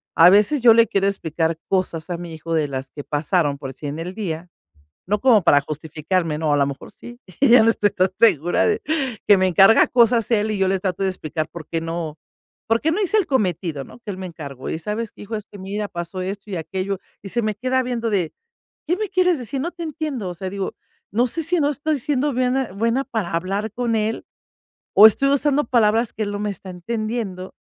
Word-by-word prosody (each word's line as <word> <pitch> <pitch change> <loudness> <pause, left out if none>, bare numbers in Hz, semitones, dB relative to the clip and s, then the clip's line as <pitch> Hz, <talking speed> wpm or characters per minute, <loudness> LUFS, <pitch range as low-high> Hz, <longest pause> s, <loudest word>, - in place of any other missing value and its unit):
a 170 +2 +8
veces 210 +9 +4
yo 235 -1 +8
le 230 0 +6
quiero 195 0 +1
explicar 165 -4 -1
cosas 180 -3 -1
a 175 - -2
mi 175 -1 -8
hijo 165 +1 -5
de 155 -2 +1
las 135 -1 -6
que 145 - -8
pasaron, 150 0 0
por 135 -1 -7
decir, 145 +2 -7
en 145 - -5
el 175 +3 -5
día, 180 -5 -5 0.6
no 210 +3 +1
como 230 -5 +5
para 145 -4 +5
justificarme, 155 +2 -2
¿no? 155 -2 0
A - - +4
la 140 - +3
mejor 140 0 -7
sí. 240 +1 -12 0.2
Ya 250 -4 +7
no 230 - +5
estoy 210 -2 +1
tan 185 0 +1
segura 175 -7 +4
de 430 0 0 0.5
que 205 - +7
me 185 0 +2
encarga 195 +5 +6
cosas 235 -2 +3
él, 215 -2 +1
y 210 - -2
yo 190 -1 +2
le 190 0 +1
trato 185 0 -3
de 195 - +2
explicar 160 -3 -4
por 165 -1 -10
qué 165 - -2
no, 165 -2 -4 0.5
por 225 +1 +2
qué 320 - +1
no 405 - -1
hice 400 +2 +1
el 395 - +1
cometido, 180 - -1
¿no? - - -14
que 230 -3 -8
él 185 - -8
me 190 - -5
encargó: 140 -6 -7
"Y - - -3
sabes 210 +6 -4
que, - - -13
hijo, 210 +2 -6
es 210 -1 -7
que 205 - -13
mira 200 +2 -4
pasó 175 +1 -6
esto 195 +2 -5
y - - -3
aquello", 190 +4 -3 0.2
y 195 - -8
se 235 +3 0
me 215 -1 -1
queda 255 +3 0
viendo 240 -2 -2
de: 180 -6 0 0.6
"¿Qué 350 +3 +1
me 425 -1 -3
quieres 365 -3 +2
decir? 255 +3 -4
No 335 - -2
te 345 -1 -7
entiendo". 305 - -4
O - - -5
sea, 185 +2 -5
digo, 195 0 -4 0.4
no 240 +4 +3
sé 325 +7 -3
si 345 +3 +1
no 290 - +2
estoy 295 +1 -1
siendo 285 +2 0
buena- 255 0 0
buena 230 +6 0
para 220 -11 -4
hablar 195 +5 -2
con 240 -1 -1
él, 220 +1 -2 0.7
o 210 - +10
estoy 275 +6 0
usando 285 +1 +2
palabras 230 -1 +2
que 220 - -3
él 205 - -4
no 205 - -3
me 210 0 -2
está 190 0 -9
entendiendo, 210 0 -4
200 Hz, 235 wpm, -21 LUFS, 170-240 Hz, 0.7 s, o